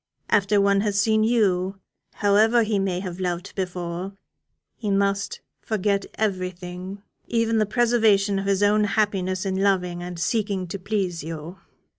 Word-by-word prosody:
After 205 Hz, 0 st, +3 dB
one 200 Hz, 0 st, +3 dB
has 205 Hz, -1 st, 0 dB
seen 220 Hz, +1 st, +3 dB
you, 195 Hz, -4 st, +1 dB, 0.4 s
however 215 Hz, +3 st, +4 dB
he 210 Hz, -2 st, 0 dB
may 185 Hz, -2 st, -1 dB
have 180 Hz, -2 st, -6 dB
loved 180 Hz, +1 st, -3 dB
before, 180 Hz, 0 st, -4 dB, 0.6 s
he 215 Hz, -, -4 dB
must 200 Hz, 0 st, 0 dB, 0.2 s
forget 200 Hz, -2 st, -1 dB
everything 185 Hz, -1 st, -4 dB, 0.2 s
even 230 Hz, -1 st, +1 dB
the 215 Hz, -, +2 dB
preservation 215 Hz, -4 st, +3 dB
of 195 Hz, -, -4 dB
his 200 Hz, 0 st, +2 dB
own 210 Hz, +1 st, +4 dB
happiness 195 Hz, -3 st, 0 dB
in 190 Hz, 0 st, -1 dB
loving 180 Hz, -3 st, +1 dB
and 175 Hz, 0 st, -6 dB
seeking 200 Hz, -1 st, -1 dB
to 195 Hz, -, -5 dB
please 185 Hz, -4 st, -2 dB
you. 160 Hz, +3 st, -7 dB
195 Hz, 145 wpm, -24 LUFS, 185-210 Hz, 0.6 s, however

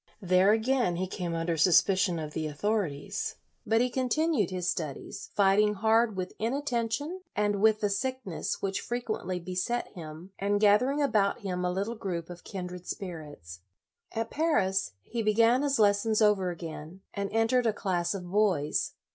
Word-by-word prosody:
There 185 Hz, 0 st, +4 dB
again 225 Hz, -3 st, +2 dB
he 185 Hz, +2 st, -1 dB
came 180 Hz, -2 st, -4 dB
under 165 Hz, 0 st, -1 dB
suspicion 180 Hz, +2 st, +4 dB
of 155 Hz, -1 st, -5 dB
the 155 Hz, -1 st, -2 dB
authorities, 200 Hz, +4 st, -2 dB, 0.3 s
but 225 Hz, +1 st, +3 dB
he -, -, +4 dB
64 250 Hz, +1 st, -1 dB
LOYOLA -, -, -3 dB
continued 310 Hz, -, +2 dB
his 180 Hz, -1 st, -3 dB
studies, 155 Hz, -6 st, -4 dB
fighting 205 Hz, +1 st, +4 dB
hard 220 Hz, +1 st, +3 dB
with 185 Hz, 0 st, -3 dB
inattention 275 Hz, +6 st, -2 dB
and 205 Hz, -1 st, +1 dB
with 215 Hz, 0 st, +4 dB
the 205 Hz, -, +2 dB
sickness 255 Hz, -4 st, -3 dB
which 195 Hz, -1 st, -1 dB
frequently 220 Hz, -7 st, -3 dB
beset 185 Hz, +7 st, -2 dB
him, 165 Hz, +2 st, -10 dB
and 205 Hz, +1 st, +1 dB
gathering 250 Hz, +8 st, +4 dB
about 215 Hz, -4 st, +1 dB
him 180 Hz, -3 st, -3 dB
a 180 Hz, -, +1 dB
little 200 Hz, +5 st, -2 dB
group 180 Hz, -6 st, -4 dB
of 175 Hz, 0 st, -10 dB
kindred 180 Hz, -2 st, -7 dB
spirits. 150 Hz, -, -7 dB, 0.5 s
At 225 Hz, 0 st, -3 dB
Paris, 195 Hz, -, +1 dB
he 235 Hz, 0 st, -3 dB
began 230 Hz, +4 st, +4 dB
his 285 Hz, -1 st, +1 dB
lessons 210 Hz, +1 st, +3 dB
over 205 Hz, -4 st, +3 dB
again, 165 Hz, +1 st, -7 dB
and 200 Hz, -1 st, -3 dB
entered 225 Hz, +2 st, +2 dB
a -, -, +4 dB
class 185 Hz, -2 st, -1 dB
of 185 Hz, -2 st, -6 dB
boys. 190 Hz, -8 st, +1 dB
200 Hz, 165 wpm, -29 LUFS, 180-225 Hz, 0.5 s, There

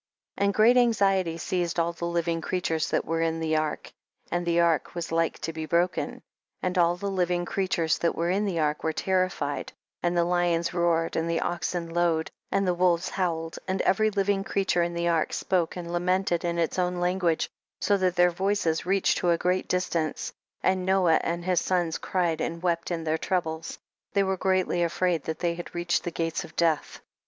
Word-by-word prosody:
29. 200 Hz, -, +2 dB
And -, -, -1 dB
great 230 Hz, +4 st, +6 dB
anxiety 195 Hz, -8 st, +3 dB
seized 175 Hz, 0 st, -1 dB
all 170 Hz, 0 st, +1 dB
tlie 170 Hz, 0 st, -4 dB
living 170 Hz, -1 st, 0 dB
creatures 165 Hz, -3 st, -1 dB
that -, -, 0 dB
were 165 Hz, 0 st, -1 dB
in 165 Hz, 0 st, 0 dB
the 160 Hz, -1 st, 0 dB
ark, 155 Hz, -1 st, -2 dB, 0.4 s
and 175 Hz, 0 st, -1 dB
the 170 Hz, 0 st, +3 dB
ark 170 Hz, -1 st, +2 dB
was 170 Hz, -1 st, -4 dB
like 165 Hz, 0 st, +1 dB
to 165 Hz, -, -5 dB
be 160 Hz, 0 st, -5 dB
broken. 175 Hz, +2 st, +1 dB
30. -, -, -14 dB, 0.4 s
And 185 Hz, 0 st, -1 dB
all 170 Hz, 0 st, +4 dB
the 200 Hz, +2 st, -3 dB
living 180 Hz, -2 st, 0 dB
creatures 175 Hz, -4 st, 0 dB
that 170 Hz, -, +1 dB
were 170 Hz, +1 st, 0 dB
in 200 Hz, +3 st, +1 dB
the 190 Hz, -4 st, -1 dB
ark 150 Hz, -1 st, 0 dB
were 160 Hz, -, 0 dB
terrified, 185 Hz, -6 st, -1 dB, 0.3 s
and 175 Hz, 0 st, 0 dB
the 170 Hz, -, +4 dB
lions 175 Hz, -1 st, +1 dB
roared, 170 Hz, -1 st, +1 dB
and 165 Hz, +1 st, 0 dB
the 170 Hz, -, +1 dB
oxen 175 Hz, 0 st, -2 dB
lowed, 165 Hz, -1 st, 0 dB, 0.2 s
and 195 Hz, 0 st, +2 dB
the 180 Hz, -, +3 dB
wolves 175 Hz, 0 st, +2 dB
howled, 165 Hz, -3 st, -2 dB
and 190 Hz, 0 st, -1 dB
every 215 Hz, +3 st, +3 dB
living 200 Hz, -1 st, 0 dB
creature 195 Hz, -3 st, +1 dB
in 170 Hz, 0 st, -1 dB
the 170 Hz, 0 st, 0 dB
ark 165 Hz, -2 st, +1 dB
spoke 180 Hz, -3 st, 0 dB
and 175 Hz, -1 st, -6 dB
lamented 180 Hz, 0 st, +1 dB
in 170 Hz, -1 st, -1 dB
its 170 Hz, +2 st, 0 dB
own 180 Hz, 0 st, +1 dB
lan 180 Hz, +2 st, 0 dB
guage, 170 Hz, -3 st, +1 dB, 0.3 s
so 205 Hz, -, +2 dB
that 185 Hz, -2 st, +1 dB
their 175 Hz, 0 st, +5 dB
voices 180 Hz, -3 st, 0 dB
reached 195 Hz, 0 st, +2 dB
to 175 Hz, -, +1 dB
a 170 Hz, -, +4 dB
great 180 Hz, +2 st, 0 dB
distance, 170 Hz, -4 st, -1 dB, 0.3 s
and 185 Hz, 0 st, +2 dB
Noah 185 Hz, -3 st, +3 dB
and 170 Hz, 0 st, -2 dB
his 185 Hz, -2 st, +2 dB
sons 175 Hz, -3 st, 0 dB
cried 170 Hz, -4 st, 0 dB
and 170 Hz, +1 st, -3 dB
wept 170 Hz, -2 st, 0 dB
in 170 Hz, -2 st, -2 dB
their 160 Hz, 0 st, 0 dB
troubles; 165 Hz, -3 st, -2 dB, 0.4 s
they 200 Hz, -, +3 dB
were 190 Hz, 0 st, 0 dB
greatly 185 Hz, -2 st, +1 dB
afraid 170 Hz, -1 st, 0 dB
that 160 Hz, -, -3 dB
they 170 Hz, -1 st, 0 dB
had 175 Hz, +1 st, -8 dB
reached 175 Hz, 0 st, 0 dB
the -, -, -2 dB
gates 165 Hz, -1 st, -2 dB
of 160 Hz, -, -13 dB
death. 165 Hz, -3 st, 0 dB
175 Hz, 205 wpm, -27 LUFS, 165-185 Hz, 0.4 s, great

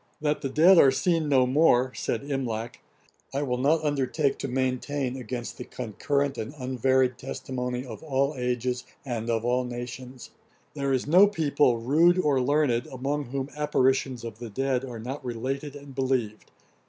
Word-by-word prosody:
'That 150 Hz, 0 st, 0 dB
the 135 Hz, -, -2 dB
dead 165 Hz, +6 st, +6 dB
are 135 Hz, -, +8 dB
seen 160 Hz, +3 st, +1 dB
no 130 Hz, -3 st, +4 dB
more, 130 Hz, -2 st, +3 dB
(said 115 Hz, -, -3 dB
Imlac,) 120 Hz, -5 st, -3 dB, 0.6 s
I 140 Hz, -, 0 dB
will 125 Hz, -3 st, -1 dB
not 155 Hz, +4 st, +2 dB
undertake 145 Hz, 0 st, 0 dB
to -, -, -3 dB
maintain, 130 Hz, +1 st, -1 dB
against 125 Hz, -1 st, -6 dB
the -, -, -4 dB
concurrent 140 Hz, +5 st, -2 dB
and 110 Hz, +7 st, -5 dB
unvaried 130 Hz, 0 st, +1 dB
testimony 125 Hz, 0 st, -4 dB
of 115 Hz, -4 st, -9 dB
all 140 Hz, -1 st, 0 dB
ages, 125 Hz, 0 st, -2 dB, 0.2 s
and 120 Hz, -3 st, -3 dB
of 115 Hz, 0 st, 0 dB
all 125 Hz, +1 st, +1 dB
nations. 125 Hz, +1 st, -7 dB, 0.4 s
There 140 Hz, -2 st, -2 dB
is 130 Hz, -2 st, +1 dB
no 180 Hz, +7 st, +7 dB
people, 150 Hz, -, +2 dB
rude 165 Hz, +9 st, +4 dB
or 145 Hz, -7 st, +2 dB
learned, 125 Hz, -3 st, +1 dB
among 140 Hz, +3 st, -2 dB
whom 135 Hz, +2 st, -4 dB
apparitions 130 Hz, -4 st, +1 dB
of 115 Hz, -2 st, -7 dB
the 120 Hz, -1 st, -7 dB
dead 130 Hz, +3 st, -1 dB
are 125 Hz, -3 st, -6 dB
not 130 Hz, +6 st, -6 dB
related 135 Hz, +4 st, -4 dB
and 140 Hz, -1 st, -11 dB
believed. 130 Hz, -5 st, -1 dB
130 Hz, 165 wpm, -26 LUFS, 125-145 Hz, 0.6 s, are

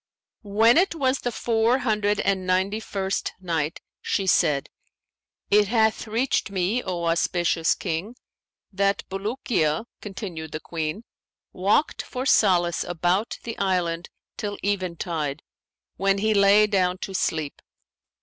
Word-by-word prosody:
When 225 Hz, +4 st, +6 dB
it 360 Hz, -1 st, +3 dB
was 270 Hz, -3 st, +1 dB
the 245 Hz, -, -2 dB
Four 230 Hz, +1 st, +2 dB
Hundred 210 Hz, -5 st, 0 dB
and 190 Hz, -2 st, 0 dB
Ninety 190 Hz, +3 st, +1 dB
first 195 Hz, -3 st, -3 dB
Night, 165 Hz, -3 st, -2 dB, 0.2 s
She 195 Hz, -, -1 dB
said, 150 Hz, -6 st, +2 dB, 0.8 s
It 205 Hz, 0 st, +5 dB
hath 220 Hz, 0 st, +1 dB
reached 230 Hz, +2 st, 0 dB
me, 195 Hz, +5 st, 0 dB
O 175 Hz, -5 st, -4 dB
auspicious 170 Hz, 0 st, +1 dB
King, 180 Hz, +6 st, -4 dB, 0.6 s
that 200 Hz, +1 st, 0 dB
"Bulukiya 195 Hz, -, -1 dB, 0.2 s
(continued 185 Hz, -6 st, -7 dB
the 155 Hz, -, -3 dB
Queen) 160 Hz, +5 st, -4 dB, 0.5 s
walked 200 Hz, +11 st, +1 dB
for 255 Hz, 0 st, -5 dB
solace 175 Hz, -9 st, +3 dB
about 175 Hz, +5 st, 0 dB
the 230 Hz, -, -5 dB
island 175 Hz, -3 st, 0 dB, 0.3 s
till 205 Hz, -2 st, -4 dB
eventide, 170 Hz, -6 st, -2 dB, 0.5 s
when 195 Hz, +1 st, +2 dB
he 215 Hz, +2 st, +1 dB
lay 200 Hz, +1 st, +6 dB
down 185 Hz, -3 st, +1 dB
to 195 Hz, -, -6 dB
sleep. 160 Hz, -5 st, -2 dB
195 Hz, 125 wpm, -24 LUFS, 175-215 Hz, 0.8 s, When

